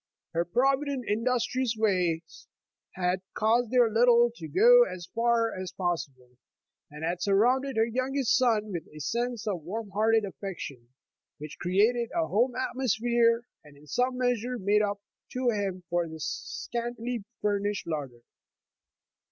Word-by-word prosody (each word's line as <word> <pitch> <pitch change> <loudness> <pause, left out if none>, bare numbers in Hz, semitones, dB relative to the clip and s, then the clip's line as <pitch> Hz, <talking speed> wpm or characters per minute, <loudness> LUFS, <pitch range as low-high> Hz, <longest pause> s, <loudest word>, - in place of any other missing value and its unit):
Her 170 +1 +1
provident, 270 +5 +1
industrious 245 +2 0
ways 180 -6 -1 0.5
had 180 0 0
caused 230 +2 +2
their 245 -1 +4
little 235 +1 +4
to 165 -8 -8
go 485 - +6
as 180 - -6
far 230 -1 +2
as 185 -1 -6
possible, 140 -9 -4 0.5
and 150 +2 -6
had 175 +1 -2
sur 200 -1 +2
rounded 260 +5 +2
her 225 - +4
youngest 255 +2 0
son 225 -5 +2
with 170 -4 -5
a 155 - -12
sense 235 - -2
of 195 -6 -2
warm 200 +6 -6
hearted 220 +2 +2
affection, 170 -11 -7 0.5
which 150 0 -9
created 220 +6 +2
a 335 -1 +2
home 245 +2 +1
atmosphere, 235 -2 +1 0.2
and 145 -2 -17
in 145 - -17
some 250 - 0
measure 245 0 0
made 205 0 +2
up 205 -1 -1 0.3
to 250 -1 +1
him 195 -4 -3
for 175 0 0
the 160 0 -9
scantily 235 - -4 0.2
furnished 205 -1 -1
larder. 140 -7 -5
220 Hz, 145 wpm, -28 LUFS, 180-245 Hz, 0.5 s, go